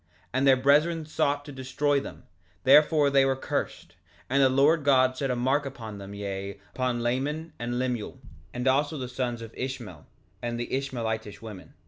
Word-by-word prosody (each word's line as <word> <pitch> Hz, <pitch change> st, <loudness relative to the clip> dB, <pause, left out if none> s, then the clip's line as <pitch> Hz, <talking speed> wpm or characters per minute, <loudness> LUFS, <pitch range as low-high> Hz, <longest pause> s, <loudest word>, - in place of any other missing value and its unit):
3:7 80 Hz, -, -40 dB, 0.3 s
And 135 Hz, +2 st, +2 dB
their 135 Hz, -1 st, +7 dB
brethren 150 Hz, +5 st, +3 dB
sought 145 Hz, -2 st, 0 dB
to 145 Hz, -, -8 dB
destroy 140 Hz, +2 st, 0 dB
them, -, -, -9 dB, 0.4 s
therefore 145 Hz, +1 st, +5 dB
they 135 Hz, -1 st, +5 dB
were 135 Hz, 0 st, +2 dB
cursed; 135 Hz, -, -4 dB, 0.4 s
and 140 Hz, +1 st, +4 dB
the 135 Hz, -, +6 dB
Lord 145 Hz, +4 st, +4 dB
God 130 Hz, -2 st, +4 dB
set 135 Hz, +1 st, -2 dB
a 125 Hz, -, +1 dB
mark 130 Hz, +4 st, +1 dB
upon 115 Hz, -7 st, -7 dB
them, 100 Hz, +1 st, -8 dB
yea, 100 Hz, 0 st, -5 dB
upon 125 Hz, -2 st, -1 dB
Laman 145 Hz, +7 st, -2 dB
and 120 Hz, +1 st, -2 dB
Lemuel, 125 Hz, -1 st, -3 dB, 0.3 s
and 125 Hz, +3 st, -3 dB
also 145 Hz, +4 st, +2 dB
the 130 Hz, -2 st, -4 dB
sons 125 Hz, -2 st, -3 dB
of 115 Hz, -, -10 dB
Ishmael, 120 Hz, -, -6 dB, 0.3 s
and 120 Hz, 0 st, -3 dB
Ishmaelitish 115 Hz, -5 st, -3 dB
women. 105 Hz, -5 st, -10 dB
130 Hz, 175 wpm, -27 LUFS, 120-140 Hz, 0.4 s, their